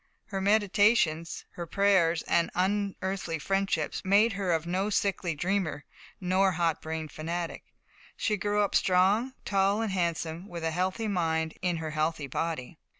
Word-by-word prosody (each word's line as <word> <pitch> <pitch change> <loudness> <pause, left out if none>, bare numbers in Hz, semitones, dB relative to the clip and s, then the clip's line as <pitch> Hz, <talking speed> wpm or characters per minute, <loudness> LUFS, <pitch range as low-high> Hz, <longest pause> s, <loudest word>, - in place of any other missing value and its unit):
Her 195 -1 -4
meditations, 205 -5 +2
her 170 -1 -7
prayers 185 -4 +3
and 170 - +2
unearthly 190 -2 -1
friendships, 195 +5 -1
made 205 +4 +4
of 200 - -5
her 180 -5 +1
no 185 +4 -1
sickly 195 -4 0
dreamer 175 -3 -1 0.3
nor 190 0 +2
hot 165 -2 0
brained 160 -1 -5
fanatic. 170 +2 -4 0.5
She 215 -2 +1
grew 205 +1 +1
up 200 - -1
strong, 195 +8 +3
tall 195 +1 +2
and 220 - -2
handsome, 170 -1 -2
with 170 -4 -7
a 165 - 0
healthy 185 +6 -1
mind 160 -4 0
in 180 -2 0
her 160 -1 -4
healthy 155 -1 -1
body. 155 +1 -4
180 Hz, 150 wpm, -29 LUFS, 165-200 Hz, 0.5 s, made